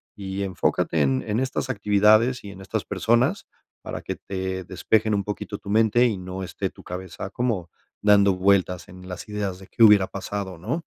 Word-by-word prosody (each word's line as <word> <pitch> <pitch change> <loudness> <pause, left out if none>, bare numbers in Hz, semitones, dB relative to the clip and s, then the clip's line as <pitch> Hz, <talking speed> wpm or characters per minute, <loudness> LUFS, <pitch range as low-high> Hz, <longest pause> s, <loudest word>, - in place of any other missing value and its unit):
y 95 -1 -5
enfócate 90 -3 0
en 65 -1 +1
en 105 +1 0
estas 130 0 -2
actividades 110 +2 +3
y 100 - -8
en 95 - -12
estas 95 - -3
personas 130 - +1 0.4
para - - -5
que - - -4
te 95 -1 -4
despejen 110 +4 +1
un 100 - 0
poquito 105 0 -5
tu - - -10
mente 110 +3 +4
y 110 -4 -1
no 95 +1 -6
esté 95 - -4
tu - - -16
cabeza 95 +1 -6
como 110 -8 -1 0.3
dando 100 -1 +5
vueltas 90 -3 +2
en 90 0 -12
las 90 +2 -7
ideas 100 -3 -3
de 95 - -13
qué 115 - +2
hubiera 105 -3 +7
pasado, 100 -2 -5
¿no? 160 - -3
100 Hz, 185 wpm, -24 LUFS, 95-110 Hz, 0.4 s, hubiera